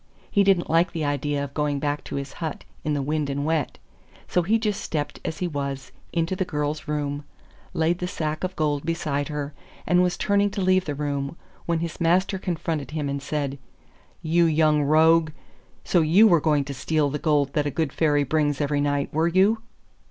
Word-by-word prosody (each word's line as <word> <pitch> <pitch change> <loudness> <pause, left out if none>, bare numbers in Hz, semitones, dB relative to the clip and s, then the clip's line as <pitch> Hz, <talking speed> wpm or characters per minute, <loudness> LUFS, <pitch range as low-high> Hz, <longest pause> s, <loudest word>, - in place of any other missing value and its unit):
He 200 - +4
didn't 190 -3 +3
like 165 +3 +2
the 160 -2 -2
idea 145 0 -1
of 140 -1 -7
going 150 -1 0
back 145 +1 -2
to - - -6
his 140 0 -4
hut 160 -2 -4 0.2
in 150 -2 0
the 140 - -1
wind 150 0 -1
and 140 +1 -2
wet, 160 -3 -1 0.5
so 180 - +2
he 210 +7 +2
just 210 -3 -1
stepped 150 -2 -3
as 160 - -4
he 180 - -1
was 140 -4 -4 0.2
into 170 +2 0
the 185 - 0
girl's 150 -2 -3
room, 145 -1 -2 0.5
laid 165 +2 +1
the 180 - -2
sack 155 -2 -3
of 185 0 -2
gold 145 -2 0
beside 150 -4 -1
her, 150 -1 -4 0.3
and 180 0 +4
was 180 -1 +1
turning 205 0 +2
to 200 - -4
leave 185 0 +3
the 145 - -3
room, 145 +1 -3 0.3
when 170 -1 0
his 170 +1 -5
master 185 +3 +2
confronted 165 -5 -3
him 150 -2 -3
and 140 0 -3
said, 140 -1 -3 0.6
'You 170 +2 +3
young 155 -1 +3
rogue, 160 +2 +4 0.5
so 175 - +3
you 175 +8 +6
were 170 -6 +4
going 150 -2 +2
to 140 - -5
steal 145 +2 0
the 150 - -3
gold 145 -4 +1
that 145 -1 +1
a - - +1
good 150 0 -2
Fairy 145 -3 +2
brings 145 0 0
every 145 -1 0
night, 145 -1 -1
were 160 +2 +2
you? 195 +6 +3
155 Hz, 205 wpm, -24 LUFS, 145-170 Hz, 0.6 s, you